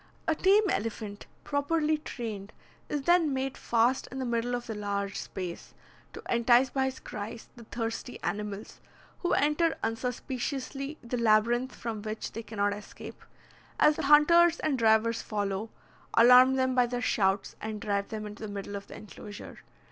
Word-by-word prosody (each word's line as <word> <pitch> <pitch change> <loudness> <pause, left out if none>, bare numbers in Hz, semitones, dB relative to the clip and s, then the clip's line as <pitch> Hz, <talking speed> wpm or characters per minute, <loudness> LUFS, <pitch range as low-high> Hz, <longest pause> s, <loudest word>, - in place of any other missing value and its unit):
A 325 - +4
tame 395 +6 +4
elephant, 210 -1 -4 0.2
properly 300 +2 0
trained, 220 -8 -6 0.4
is 290 -2 -2
then 345 -1 +4
made 265 0 -2
fast 235 +3 +1
in 265 - -6
the 260 - -2
middle 240 +1 -1
of 245 - -5
the 225 - -5
large 200 -1 -3
space, 180 -3 -6 0.4
to - - -9
entice 240 +2 +4
by 265 -1 +1
his 265 0 -4
cries 215 +2 -7
the 235 -2 -12
thirsty 230 +2 -4
animals, 210 0 -4 0.4
who 350 - 0
enter 300 +4 +2
unsuspiciously 260 +4 -3
the 240 +1 -3
labyrinth 235 +3 +2
from 225 -3 -5
which 215 +1 -5
they 225 - -5
cannot 205 -2 -1
escape, 205 +1 -10 0.6
as 300 0 +5
the - - -3
hunters 335 +3 +6
and 275 -4 0
drivers 225 0 +3
follow, 205 0 -3 0.5
alarm 250 +3 +7
them 260 -1 +1
by 250 -1 +3
their 245 0 -3
shouts, 200 -6 0
and 215 -1 -4
drive 200 -1 -1
them 215 -1 -5
into 210 0 -9
the 215 -2 -5
middle 200 0 -6
of 200 0 -7
the - - -10
enclosure. 205 0 -10
235 Hz, 165 wpm, -29 LUFS, 210-265 Hz, 0.6 s, alarm